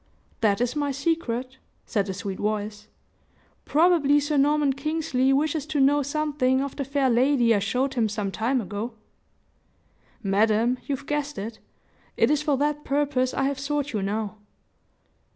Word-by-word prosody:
"That 210 Hz, -1 st, +2 dB
is 245 Hz, +3 st, 0 dB
my 290 Hz, -1 st, 0 dB
secret," 265 Hz, -4 st, -2 dB, 0.3 s
said 205 Hz, -3 st, -1 dB
the 190 Hz, -, -4 dB
sweet 195 Hz, -1 st, -5 dB
voice. 210 Hz, 0 st, -3 dB, 0.8 s
"Probably 300 Hz, -3 st, +4 dB
Sir 290 Hz, +1 st, -1 dB
Norman 290 Hz, 0 st, +3 dB
Kingsley 275 Hz, -2 st, 0 dB
wishes 300 Hz, +1 st, 0 dB
to 305 Hz, -2 st, -1 dB
know 285 Hz, +2 st, +4 dB
something 285 Hz, -2 st, 0 dB
of 275 Hz, 0 st, -3 dB
the 280 Hz, -, -2 dB
fair 275 Hz, 0 st, 0 dB
lady 245 Hz, -1 st, +3 dB
I 205 Hz, -, +2 dB
showed 250 Hz, +7 st, -1 dB
him 230 Hz, -4 st, +1 dB
some 205 Hz, -2 st, -3 dB
time 240 Hz, +6 st, 0 dB
ago?" 210 Hz, +4 st, -5 dB, 1.3 s
"Madam, 220 Hz, +5 st, +2 dB
you've 280 Hz, -1 st, -3 dB
guessed 295 Hz, -2 st, -2 dB
it. 220 Hz, +3 st, -6 dB, 0.6 s
It -, -, +3 dB
is 300 Hz, -1 st, +2 dB
for 295 Hz, -2 st, +1 dB
that 295 Hz, +1 st, 0 dB
purpose 275 Hz, -2 st, 0 dB
I 270 Hz, -, 0 dB
have 275 Hz, 0 st, -1 dB
sought 290 Hz, 0 st, -2 dB
you 210 Hz, -, -1 dB
now." 210 Hz, +2 st, -3 dB
270 Hz, 155 wpm, -25 LUFS, 220-290 Hz, 1.3 s, Probably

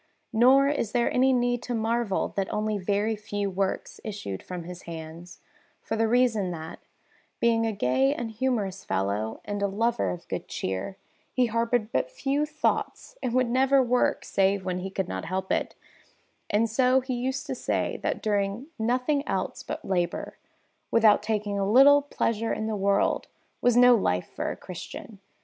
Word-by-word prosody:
Nor 260 Hz, +5 st, +6 dB
is 280 Hz, -7 st, -1 dB
there 240 Hz, -1 st, +2 dB
any 260 Hz, +1 st, +4 dB
need 245 Hz, -1 st, +1 dB
to 245 Hz, -, -3 dB
marvel 225 Hz, -2 st, 0 dB
that 195 Hz, -1 st, -3 dB
only 215 Hz, 0 st, -1 dB
very 205 Hz, +3 st, 0 dB
few 205 Hz, -2 st, -3 dB
works 190 Hz, +1 st, -2 dB
issued 195 Hz, -, -5 dB
from 180 Hz, -2 st, -6 dB
his 180 Hz, +1 st, -9 dB
hands, 165 Hz, +2 st, -9 dB, 0.4 s
for 225 Hz, -, -4 dB
the 225 Hz, 0 st, +2 dB
reason 225 Hz, -5 st, +2 dB
that, 160 Hz, -2 st, -7 dB, 0.6 s
being 230 Hz, -1 st, +2 dB
a -, -, 0 dB
gay 130 Hz, -7 st, +2 dB
and 230 Hz, -2 st, -3 dB
humorous 215 Hz, -5 st, -1 dB
fellow 100 Hz, +3 st, -2 dB
and 205 Hz, 0 st, -3 dB
a 200 Hz, -, +2 dB
lover 205 Hz, -, 0 dB
of 90 Hz, -, -6 dB
good -, -, -4 dB
cheer, 95 Hz, -, -4 dB, 0.3 s
he 255 Hz, -, +2 dB
harboured 230 Hz, -1 st, 0 dB
but -, -, 0 dB
few 290 Hz, -, -1 dB
thoughts 310 Hz, +10 st, -2 dB
and 235 Hz, -, -2 dB
would 255 Hz, -1 st, +3 dB
never 265 Hz, +2 st, +4 dB
work 250 Hz, 0 st, +1 dB
save 195 Hz, 0 st, +1 dB
when 180 Hz, -1 st, -2 dB
he 190 Hz, +1 st, -4 dB
could 190 Hz, -1 st, -3 dB
not 95 Hz, 0 st, -4 dB
help 190 Hz, +2 st, -3 dB
it; -, -, -1 dB, 0.7 s
and 215 Hz, +3 st, +2 dB
so 255 Hz, +3 st, +3 dB
he 260 Hz, 0 st, -4 dB
used 260 Hz, +3 st, -2 dB
to -, -, -3 dB
say -, -, -2 dB
that -, -, -2 dB
doing 205 Hz, +5 st, -1 dB
nothing 250 Hz, +5 st, +1 dB
else -, -, -2 dB
but -, -, -6 dB
labour, 175 Hz, -2 st, -2 dB, 0.5 s
without 220 Hz, -2 st, +5 dB
taking 210 Hz, -2 st, -1 dB
a 195 Hz, +1 st, 0 dB
little 285 Hz, +4 st, +7 dB
pleasure 230 Hz, -5 st, -1 dB
in 215 Hz, -, -2 dB
the 220 Hz, -1 st, -1 dB
world, 200 Hz, 0 st, +1 dB, 0.3 s
was 245 Hz, -1 st, +3 dB
no 250 Hz, 0 st, +8 dB
life 90 Hz, -, 0 dB
for -, -, -2 dB
a -, -, -5 dB
Christian. -, -, -9 dB
220 Hz, 175 wpm, -27 LUFS, 190-245 Hz, 0.7 s, no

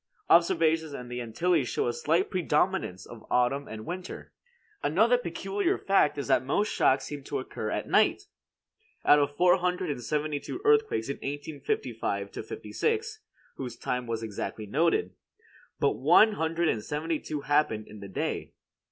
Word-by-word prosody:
Observations 160 Hz, -2 st, +4 dB
in 125 Hz, -2 st, -7 dB
the 125 Hz, 0 st, -4 dB
Antilles 130 Hz, +4 st, 0 dB
show -, -, 0 dB
a 120 Hz, -, 0 dB
slight 165 Hz, +9 st, +1 dB
predominance 180 Hz, -, 0 dB
of 115 Hz, -2 st, -11 dB
autumn 125 Hz, +3 st, +1 dB
and 110 Hz, -1 st, -8 dB
winter. 180 Hz, +2 st, -7 dB, 0.5 s
Another 220 Hz, +11 st, +3 dB
peculiar 195 Hz, -2 st, -1 dB
fact 195 Hz, -7 st, +2 dB
is 140 Hz, -4 st, -3 dB
that -, -, +3 dB
most 200 Hz, +11 st, 0 dB
shocks 135 Hz, 0 st, +3 dB
seem 145 Hz, -1 st, -7 dB
to 140 Hz, -, -3 dB
occur 110 Hz, -4 st, -5 dB
at -, -, -3 dB
night. -, -, +3 dB, 0.8 s
Out 150 Hz, -, +7 dB
of 145 Hz, 0 st, 0 dB
four 180 Hz, +1 st, +5 dB
hundred 180 Hz, -2 st, -1 dB
and 130 Hz, -4 st, -5 dB
seventy 150 Hz, +3 st, -1 dB
two 350 Hz, -, -6 dB
earthquakes 435 Hz, -, +3 dB
in 140 Hz, -, -3 dB
1855 135 Hz, -8 st, -3 dB
56, 440 Hz, 0 st, -3 dB, 0.4 s
whose 130 Hz, -2 st, -5 dB
time 125 Hz, -1 st, -3 dB
was 115 Hz, -1 st, -3 dB
exactly 110 Hz, 0 st, -5 dB
noted, 165 Hz, -, +1 dB, 0.7 s
but -, -, +3 dB
one 220 Hz, +1 st, +5 dB
hundred 165 Hz, -3 st, 0 dB
and 110 Hz, -8 st, 0 dB
seventy 155 Hz, +3 st, -2 dB
two 150 Hz, -2 st, -5 dB
happened 145 Hz, -7 st, +1 dB
in 105 Hz, -, -11 dB
the 100 Hz, -, -8 dB
day. 95 Hz, -, -3 dB
150 Hz, 160 wpm, -28 LUFS, 125-180 Hz, 0.8 s, Out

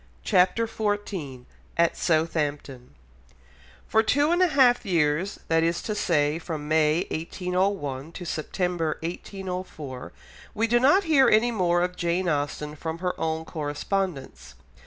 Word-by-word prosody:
CHAPTER 195 Hz, +4 st, +3 dB
XIV 205 Hz, -, -3 dB, 0.3 s
AT 170 Hz, 0 st, +3 dB
SOUTHAMPTON 150 Hz, -6 st, -1 dB, 0.9 s
For 220 Hz, -, +4 dB
two 285 Hz, +8 st, +2 dB
and 350 Hz, +1 st, +2 dB
a 365 Hz, -, +6 dB
half 260 Hz, -6 st, +4 dB
years, 170 Hz, -1 st, 0 dB
that 165 Hz, 0 st, +3 dB
is 170 Hz, +1 st, +1 dB
to 215 Hz, -, -2 dB
say 155 Hz, -6 st, +1 dB
from 155 Hz, -3 st, -5 dB
May 155 Hz, +1 st, +2 dB
1801 180 Hz, -4 st, -2 dB
to 180 Hz, -, -7 dB
September 170 Hz, 0 st, -2 dB
1804, 180 Hz, -6 st, -6 dB, 0.4 s
we 220 Hz, +2 st, +2 dB
do 240 Hz, +1 st, +3 dB
not 290 Hz, +11 st, +5 dB
hear 295 Hz, -6 st, +5 dB
any 225 Hz, +3 st, +4 dB
more 175 Hz, -5 st, +2 dB
of 180 Hz, 0 st, -2 dB
Jane 175 Hz, +1 st, -1 dB
Austen 150 Hz, -1 st, -2 dB
from 160 Hz, +2 st, -5 dB
her 180 Hz, +1 st, -2 dB
own 160 Hz, 0 st, -1 dB
correspondence. 155 Hz, +1 st, -4 dB
175 Hz, 135 wpm, -25 LUFS, 155-205 Hz, 0.9 s, a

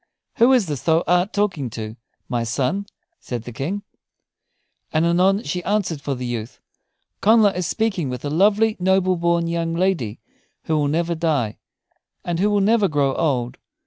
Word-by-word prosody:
"Who 235 Hz, +3 st, +5 dB
is 250 Hz, -6 st, +4 dB
this 145 Hz, -6 st, -4 dB
thou 165 Hz, 0 st, +2 dB
art 180 Hz, +3 st, +2 dB
talking 190 Hz, -11 st, -1 dB
to, 110 Hz, -1 st, -6 dB, 0.3 s
my 120 Hz, -2 st, -1 dB
son?" 140 Hz, -, -1 dB, 0.3 s
said 120 Hz, -3 st, -5 dB
the 120 Hz, -, -8 dB
King. 170 Hz, -, -4 dB, 1.1 s
And 160 Hz, +1 st, +2 dB
anon 185 Hz, +4 st, +3 dB
she 180 Hz, +4 st, -3 dB
answered 195 Hz, -7 st, -1 dB
for 140 Hz, -1 st, -2 dB
the 125 Hz, 0 st, -5 dB
youth: 115 Hz, -2 st, -5 dB, 0.6 s
"Connla 215 Hz, -1 st, +5 dB
is 180 Hz, -1 st, -2 dB
speaking 195 Hz, -, -1 dB
with 125 Hz, +2 st, -5 dB
a 145 Hz, -, -2 dB
lovely, 210 Hz, +6 st, +3 dB
noble 185 Hz, 0 st, +2 dB
born 170 Hz, 0 st, +1 dB
young 165 Hz, 0 st, -2 dB
lady, 170 Hz, -, 0 dB, 0.4 s
who 160 Hz, -, -1 dB
will 150 Hz, -1 st, +1 dB
never 170 Hz, +3 st, 0 dB
die, 150 Hz, -10 st, -1 dB, 0.7 s
and 170 Hz, -1 st, -2 dB
who 205 Hz, +3 st, +3 dB
will 205 Hz, -1 st, +2 dB
never 210 Hz, 0 st, +3 dB
grow 145 Hz, -4 st, +1 dB
old. 130 Hz, -7 st, -1 dB
170 Hz, 170 wpm, -22 LUFS, 140-195 Hz, 1.1 s, Who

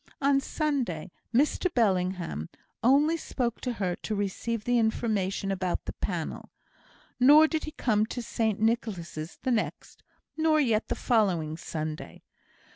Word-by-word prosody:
On 275 Hz, 0 st, +3 dB
Sunday, 260 Hz, -, -2 dB, 0.2 s
Mr 295 Hz, +8 st, +2 dB
Bellingham 185 Hz, -, 0 dB, 0.3 s
only 290 Hz, +7 st, +4 dB
spoke 245 Hz, -6 st, -3 dB
to 250 Hz, -, -2 dB
her 185 Hz, -5 st, -1 dB
to 215 Hz, -, -4 dB
receive 205 Hz, +3 st, -2 dB
the 245 Hz, +1 st, +2 dB
information 210 Hz, -4 st, 0 dB
about 185 Hz, -2 st, -2 dB
the -, -, -5 dB
panel; -, -, -4 dB, 0.7 s
nor 295 Hz, +5 st, +8 dB
did 315 Hz, -1 st, -2 dB
he 310 Hz, -, -6 dB
come 215 Hz, -3 st, +1 dB
to 245 Hz, +1 st, -5 dB
St 220 Hz, -3 st, -1 dB
Nicholas' 195 Hz, -8 st, -2 dB
the 260 Hz, -, +1 dB
next, 230 Hz, -, -2 dB, 0.3 s
nor 315 Hz, -1 st, +3 dB
yet 230 Hz, -6 st, +2 dB
the -, -, -1 dB
following 185 Hz, -10 st, +1 dB
Sunday. 155 Hz, -1 st, -6 dB
225 Hz, 135 wpm, -28 LUFS, 185-260 Hz, 0.7 s, nor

